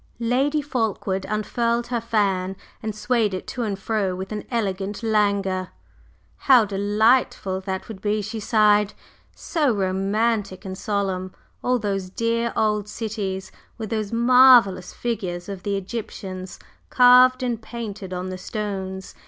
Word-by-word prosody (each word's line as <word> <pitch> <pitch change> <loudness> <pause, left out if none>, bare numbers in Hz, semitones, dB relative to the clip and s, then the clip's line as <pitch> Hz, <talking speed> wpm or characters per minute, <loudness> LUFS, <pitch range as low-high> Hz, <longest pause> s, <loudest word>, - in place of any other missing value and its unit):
Lady 270 +6 +1
Fulkeward 215 -7 -2
unfurled 235 +3 0
her 240 -2 -1
fan 195 -5 0 0.3
and 215 -1 -4
swayed 215 -3 +1
it 185 - -6
to 250 - -5
and 210 -4 -2
fro 200 -2 -1
with 190 +2 -6
an 210 -1 -4
elegant 205 -2 -2
languor. 200 -4 +1 0.7
"How 255 -5 +5
delightful 205 -1 +1
that 190 -1 -3
would 210 -4 -9
be!" 210 0 0
she 220 +2 -5
sighed. 210 -1 +3 0.4
"So 300 -6 0
romantic 200 +1 0
and 190 0 -5
solemn 190 -2 -2 0.3
all 250 0 +2
those 195 -4 -2
dear 230 +3 -1
old 210 -1 +1
cities 205 -4 -4 0.3
with 220 -3 -6
those 215 -2 -2
marvellous 235 -6 +5
figures 185 -7 -4
of 195 -2 -6
the 200 +1 -1
Egyptians 190 -3 -6 0.3
carved 255 +1 +6
and 235 -3 -2
painted 220 -4 -7
on 180 0 -4
the 185 0 -6
stones! 190 -2 -5
210 Hz, 135 wpm, -23 LUFS, 190-230 Hz, 0.7 s, carved